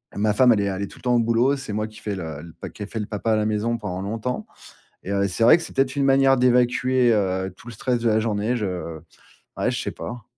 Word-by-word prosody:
Ma 105 Hz, +1 st, +1 dB
femme, 125 Hz, +3 st, +5 dB
elle 105 Hz, -, +1 dB
est 100 Hz, -, 0 dB
a 95 Hz, -, -3 dB
elle 100 Hz, -, -4 dB
est 100 Hz, -, -3 dB
tout -, -, -15 dB
le -, -, -21 dB
temps 125 Hz, -1 st, +2 dB
au -, -, +4 dB
boulot, 115 Hz, +4 st, +2 dB
c'est 135 Hz, -6 st, -6 dB
moi 105 Hz, +1 st, -1 dB
qui 110 Hz, 0 st, -14 dB
fait 105 Hz, -2 st, -4 dB
le 80 Hz, -5 st, -6 dB
le 85 Hz, 0 st, -12 dB
pa -, -, -8 dB
qui -, -, -14 dB
est -, -, -4 dB
fait 115 Hz, -, -3 dB
le 105 Hz, -, -2 dB
papa 110 Hz, +2 st, -1 dB
à -, -, +3 dB
la 105 Hz, 0 st, +1 dB
maison 110 Hz, +2 st, 0 dB
pendant 95 Hz, -4 st, -5 dB
longtemps 115 Hz, +5 st, -3 dB, 0.6 s
et 95 Hz, -, -5 dB
heu, 100 Hz, 0 st, +1 dB
c'est 105 Hz, +4 st, -1 dB
vrai 120 Hz, -, +8 dB
que 170 Hz, -, -6 dB
c'est -, -, -8 dB
peut-être 135 Hz, 0 st, +1 dB
une 140 Hz, -, +1 dB
manière 135 Hz, -1 st, +4 dB
d'évacuer, 125 Hz, 0 st, +3 dB
heu, 95 Hz, -2 st, 0 dB
tout -, -, -16 dB
le 120 Hz, -, -7 dB
stress 125 Hz, +2 st, -1 dB
de 115 Hz, -, -1 dB
la 110 Hz, -, +3 dB
journée, 110 Hz, +1 st, -1 dB
je 90 Hz, -7 st, -4 dB, 0.6 s
ouais, -, -, 0 dB
je -, -, -2 dB
sais -, -, -3 dB
pas. 120 Hz, -2 st, -7 dB
110 Hz, 295 wpm, -23 LUFS, 100-125 Hz, 0.6 s, vrai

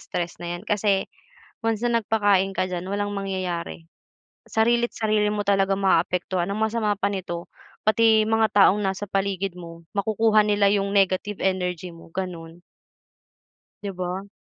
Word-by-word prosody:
stress 175 Hz, 0 st, -5 dB
na 175 Hz, 0 st, -4 dB
'yan 175 Hz, -, -11 dB
kasi 205 Hz, -2 st, +1 dB, 0.6 s
once 225 Hz, 0 st, -1 dB
na 235 Hz, -1 st, +2 dB
nagpakain 200 Hz, -3 st, +2 dB
ka -, -, +1 dB
diyan 180 Hz, -1 st, -3 dB
walang 205 Hz, 0 st, -2 dB
mangyayari, 185 Hz, -4 st, -4 dB, 0.6 s
sarili't 235 Hz, +2 st, +2 dB
sarili 215 Hz, -1 st, +1 dB
mo 210 Hz, -1 st, -1 dB
talaga 195 Hz, -1 st, +3 dB
maaapektuhan. 180 Hz, -1 st, +1 dB
Ang 200 Hz, -, -2 dB
masama 220 Hz, -1 st, +1 dB
pa 200 Hz, 0 st, 0 dB
nito, 175 Hz, -3 st, -5 dB, 0.4 s
pati 220 Hz, 0 st, +5 dB
mga 225 Hz, 0 st, +2 dB
taong 200 Hz, 0 st, +6 dB
nasa 195 Hz, +1 st, -2 dB
paligid 195 Hz, -1 st, -1 dB
mo 170 Hz, -1 st, -10 dB
makukuha 215 Hz, +1 st, +3 dB
nila 205 Hz, -1 st, +3 dB
yung 200 Hz, 0 st, 0 dB
negative 195 Hz, +1 st, +1 dB
energy 180 Hz, -2 st, -1 dB
mo, 165 Hz, 0 st, -14 dB
ganun. 175 Hz, -2 st, -6 dB, 1.2 s
Di 200 Hz, -, -3 dB
ba? 185 Hz, +2 st, -4 dB
195 Hz, 145 wpm, -24 LUFS, 180-210 Hz, 1.2 s, taong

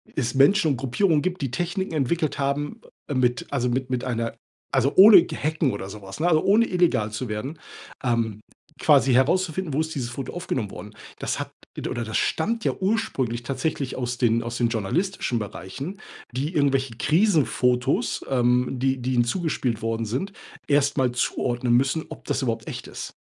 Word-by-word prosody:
es 125 Hz, -4 st, -1 dB
Menschen 160 Hz, +4 st, +5 dB
und 135 Hz, -, -1 dB
Gruppierungen 145 Hz, -, +1 dB
gibt, 185 Hz, +1 st, -2 dB
die 135 Hz, -3 st, -2 dB
Techniken 175 Hz, +6 st, -2 dB
entwickelt 155 Hz, +1 st, 0 dB
haben, 140 Hz, +1 st, -1 dB, 0.3 s
ähm, 135 Hz, -3 st, 0 dB
mit 125 Hz, 0 st, +1 dB
also 125 Hz, -3 st, 0 dB
mit 130 Hz, +1 st, -1 dB
mit 125 Hz, -1 st, -1 dB
einer 115 Hz, -2 st, -2 dB, 0.4 s
also 135 Hz, +1 st, +2 dB
ohne 205 Hz, +3 st, +10 dB
g -, -, -6 dB
Hacken 155 Hz, -2 st, 0 dB
oder 95 Hz, -1 st, -5 dB
so 105 Hz, +1 st, -9 dB
was, 95 Hz, +6 st, -9 dB
ne, 170 Hz, -, +2 dB
also 155 Hz, -2 st, +3 dB
ohne 215 Hz, +4 st, +4 dB
illegal 170 Hz, -, +2 dB
zu 120 Hz, +4 st, -4 dB
werden, 130 Hz, +9 st, -4 dB, 0.4 s
ähm, 115 Hz, -4 st, 0 dB, 0.4 s
quasi 130 Hz, -, +4 dB
herauszufinden, 160 Hz, +4 st, +1 dB
wo 145 Hz, -, +1 dB
ist 160 Hz, -1 st, -4 dB
dieses 120 Hz, -3 st, -3 dB
Foto 135 Hz, -, -6 dB
aufgenommen 130 Hz, -, -3 dB
worden? 105 Hz, +1 st, -9 dB, 0.3 s
Das -, -, -2 dB
hat -, -, -5 dB, 0.3 s
od -, -, -3 dB
oder 120 Hz, -, -3 dB
das 110 Hz, -, -1 dB
stammt 225 Hz, +7 st, 0 dB
ja -, -, +2 dB
ursprünglich 185 Hz, -, -1 dB
tatsächlich 135 Hz, +1 st, -2 dB
aus 125 Hz, -1 st, -2 dB
den 115 Hz, -1 st, +2 dB
aus 120 Hz, +1 st, -4 dB
den 120 Hz, -1 st, +2 dB
journalistischen 120 Hz, -, -1 dB
Bereichen, 135 Hz, -, -6 dB, 0.3 s
die 140 Hz, +7 st, -2 dB
irgendwelche 135 Hz, -4 st, +1 dB
Krisenfotos, 145 Hz, -, +2 dB
ähm, 125 Hz, 0 st, +2 dB
die 130 Hz, 0 st, 0 dB
die 130 Hz, +2 st, -1 dB
ihnen 120 Hz, -1 st, +3 dB
zugespielt 125 Hz, -, -1 dB
worden 115 Hz, 0 st, -1 dB
sind, 130 Hz, -, -3 dB, 0.4 s
erst 145 Hz, 0 st, +2 dB
mal 130 Hz, -2 st, +2 dB
zuordnen 120 Hz, 0 st, 0 dB
müssen, 135 Hz, +6 st, +2 dB
ob -, -, -10 dB
das -, -, -1 dB
überhaupt 115 Hz, -2 st, -2 dB
echt -, -, -7 dB
ist. -, -, -7 dB
130 Hz, 185 wpm, -24 LUFS, 120-160 Hz, 0.4 s, ohne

